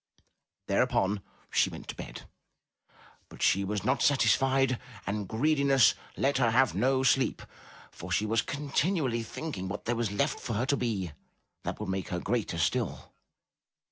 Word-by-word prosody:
Thereupon 100 Hz, +1 st, +1 dB, 0.3 s
she -, -, +3 dB
went -, -, -9 dB
to -, -, -4 dB
bed, -, -, -8 dB, 1.1 s
but -, -, -7 dB
she 100 Hz, -, +3 dB
was 100 Hz, +1 st, -2 dB
not -, -, +1 dB
satisfied, 135 Hz, -2 st, +3 dB, 0.3 s
and 100 Hz, 0 st, -2 dB
greediness 140 Hz, +2 st, +4 dB, 0.2 s
let 135 Hz, 0 st, +1 dB
her 120 Hz, -3 st, +4 dB
have 130 Hz, +3 st, +3 dB
no 130 Hz, +1 st, +2 dB
sleep, 135 Hz, 0 st, +2 dB, 0.5 s
for -, -, -9 dB
she 105 Hz, -, +2 dB
was 110 Hz, +1 st, +2 dB
con 145 Hz, +2 st, -6 dB
tinually 140 Hz, -8 st, +1 dB
thinking 115 Hz, -5 st, -5 dB
what 100 Hz, +2 st, -5 dB
there 120 Hz, -, 0 dB
was 115 Hz, -2 st, -1 dB
left 100 Hz, -, 0 dB
for 120 Hz, -, -4 dB
her 115 Hz, +4 st, 0 dB
to 140 Hz, -, +2 dB
be 105 Hz, -, -2 dB, 0.5 s
that -, -, -4 dB
would -, -, -4 dB
make 95 Hz, 0 st, -2 dB
her 90 Hz, -, -2 dB
greater 110 Hz, -5 st, -1 dB
still. 80 Hz, -, -1 dB
120 Hz, 160 wpm, -29 LUFS, 105-135 Hz, 1.1 s, greediness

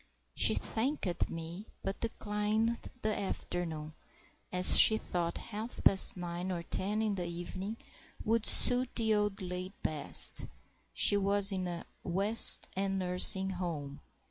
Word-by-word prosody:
She -, -, +3 dB
thanked 225 Hz, -, -3 dB
me, 165 Hz, +5 st, -9 dB, 0.2 s
but 195 Hz, -, -5 dB
declined 215 Hz, +1 st, -4 dB
the 215 Hz, 0 st, -2 dB
afternoon, 165 Hz, -5 st, -6 dB, 0.6 s
as 180 Hz, 0 st, +5 dB
she 220 Hz, -, +6 dB
thought 170 Hz, -4 st, -5 dB
half 220 Hz, +2 st, -8 dB
past 190 Hz, -1 st, +4 dB
nine 175 Hz, +1 st, -6 dB
or 170 Hz, -2 st, -6 dB
ten 210 Hz, +6 st, -1 dB
in 215 Hz, -2 st, -2 dB
the 180 Hz, -3 st, -5 dB
evening 185 Hz, +5 st, -7 dB, 0.5 s
would 225 Hz, 0 st, -1 dB
suit 250 Hz, 0 st, +6 dB
the 220 Hz, -2 st, 0 dB
old 210 Hz, -2 st, -3 dB
lady 180 Hz, +1 st, -7 dB
best; 150 Hz, -2 st, -3 dB, 0.4 s
she 205 Hz, -, +2 dB
was 200 Hz, 0 st, +2 dB
in 185 Hz, -2 st, -4 dB
a 175 Hz, -1 st, -7 dB, 0.2 s
West 200 Hz, +6 st, +6 dB
End 195 Hz, 0 st, -3 dB
nursing 190 Hz, +1 st, +4 dB
home. 160 Hz, -6 st, -7 dB
190 Hz, 135 wpm, -30 LUFS, 175-215 Hz, 0.6 s, she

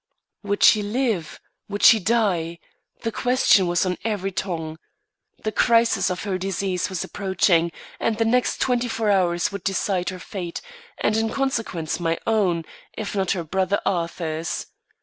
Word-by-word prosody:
Would 205 Hz, -1 st, -1 dB
she 215 Hz, -, +7 dB
live? 210 Hz, -, -1 dB, 0.3 s
Would 205 Hz, 0 st, -4 dB
she 225 Hz, -, +8 dB
die? 185 Hz, -6 st, +1 dB, 0.5 s
The 230 Hz, -, -1 dB
question 245 Hz, -6 st, +3 dB
was 175 Hz, +1 st, +1 dB
on 180 Hz, -1 st, -2 dB
every 205 Hz, -3 st, -2 dB
tongue. 165 Hz, -4 st, -4 dB, 0.6 s
The 215 Hz, -, -1 dB
crisis 230 Hz, +1 st, +3 dB
of 180 Hz, 0 st, -3 dB
her 195 Hz, -3 st, -2 dB
disease 190 Hz, -1 st, -2 dB
was 185 Hz, -3 st, -3 dB
approaching, 185 Hz, -3 st, +1 dB, 0.3 s
and 225 Hz, -1 st, 0 dB
the 225 Hz, -, +2 dB
next 245 Hz, +2 st, +1 dB
twenty 245 Hz, -1 st, +1 dB
four 225 Hz, -2 st, 0 dB
hours 180 Hz, 0 st, +2 dB
would 200 Hz, -, -6 dB
decide 190 Hz, -2 st, 0 dB
her 185 Hz, -, -6 dB
fate, 180 Hz, -2 st, -6 dB, 0.4 s
and 215 Hz, -, +1 dB
in 225 Hz, 0 st, +1 dB
consequence, 225 Hz, -, -2 dB
my 165 Hz, -1 st, 0 dB
own, 185 Hz, -7 st, +1 dB, 0.3 s
if 215 Hz, -2 st, -4 dB
not 190 Hz, -2 st, +1 dB
her 175 Hz, -3 st, -3 dB
brother 190 Hz, +4 st, 0 dB
Arthur's. 165 Hz, -2 st, -2 dB
195 Hz, 155 wpm, -23 LUFS, 175-220 Hz, 0.6 s, she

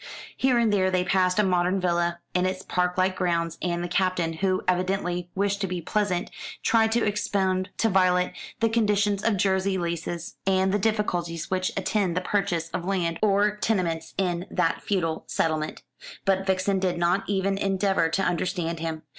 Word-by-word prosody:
Here 255 Hz, -2 st, +2 dB
and 230 Hz, -3 st, +3 dB
there 185 Hz, -2 st, +3 dB
they 185 Hz, -1 st, +1 dB
passed 185 Hz, 0 st, +2 dB
a 210 Hz, -, +4 dB
modern 180 Hz, 0 st, +2 dB
villa, 175 Hz, -1 st, 0 dB
in 180 Hz, 0 st, +2 dB
its 185 Hz, 0 st, -3 dB
park 180 Hz, 0 st, -1 dB
like 185 Hz, 0 st, +2 dB
grounds, 170 Hz, -2 st, -1 dB
and 175 Hz, -1 st, -1 dB
the -, -, -2 dB
Captain, 180 Hz, -2 st, 0 dB
who 185 Hz, +2 st, 0 dB
evidently 180 Hz, -1 st, 0 dB
wished 200 Hz, +1 st, 0 dB
to 195 Hz, -, 0 dB
be 180 Hz, -1 st, -3 dB
pleasant, 185 Hz, 0 st, -1 dB, 0.3 s
tried 225 Hz, -1 st, +3 dB
to 235 Hz, -, +2 dB
expound 190 Hz, -3 st, 0 dB
to 225 Hz, -, +2 dB
Violet 180 Hz, -2 st, +2 dB, 0.3 s
the 225 Hz, -, +3 dB
conditions 210 Hz, -3 st, +1 dB
of 225 Hz, -3 st, +2 dB
Jersey 190 Hz, 0 st, +1 dB
leases, 170 Hz, -1 st, -4 dB
and 190 Hz, 0 st, +3 dB
the 205 Hz, -, +2 dB
difficulties 180 Hz, -6 st, -1 dB
which 185 Hz, 0 st, 0 dB
attend 190 Hz, -5 st, 0 dB
the -, -, +1 dB
purchase 180 Hz, -4 st, -1 dB
of 170 Hz, -, -4 dB
land 175 Hz, -3 st, -1 dB
or 205 Hz, 0 st, +3 dB
tenements 175 Hz, -7 st, -1 dB
in 180 Hz, -1 st, -1 dB
that 165 Hz, -3 st, 0 dB
feudal 165 Hz, -5 st, -1 dB
settlement. 155 Hz, -1 st, -1 dB, 0.4 s
But 195 Hz, 0 st, +1 dB
Vixen 190 Hz, +1 st, +1 dB
did 185 Hz, -2 st, 0 dB
not 175 Hz, +3 st, +2 dB
even 195 Hz, 0 st, 0 dB
endeavour 195 Hz, -3 st, +1 dB
to 195 Hz, +4 st, 0 dB
understand 175 Hz, -2 st, -1 dB
him. 160 Hz, -1 st, -4 dB
185 Hz, 175 wpm, -26 LUFS, 175-195 Hz, 0.4 s, a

